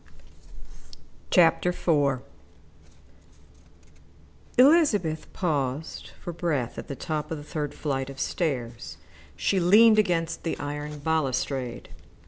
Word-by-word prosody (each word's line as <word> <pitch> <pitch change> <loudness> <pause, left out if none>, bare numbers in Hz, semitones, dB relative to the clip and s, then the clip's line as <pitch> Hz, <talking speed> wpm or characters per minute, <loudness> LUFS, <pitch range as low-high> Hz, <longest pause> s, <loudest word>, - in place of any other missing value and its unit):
CHAPTER 175 -1 +4
IV 145 -7 +1 2.4
Elizabeth 250 - +4
paused 145 -4 -2
for 175 - -6
breath 150 -8 -2
at - - -8
the 140 - -5
top 155 +1 -4
of 160 - -3
the 145 - -9
third 150 -1 -4
flight 135 -3 -2
of 135 -1 -9
stairs. 125 -8 -3 0.4
She 195 - +1
leaned 215 +5 +6
against 170 -5 0
the 165 - -3
iron 145 +1 -5
balustrade. 135 -5 -2
155 Hz, 105 wpm, -26 LUFS, 140-175 Hz, 2.4 s, leaned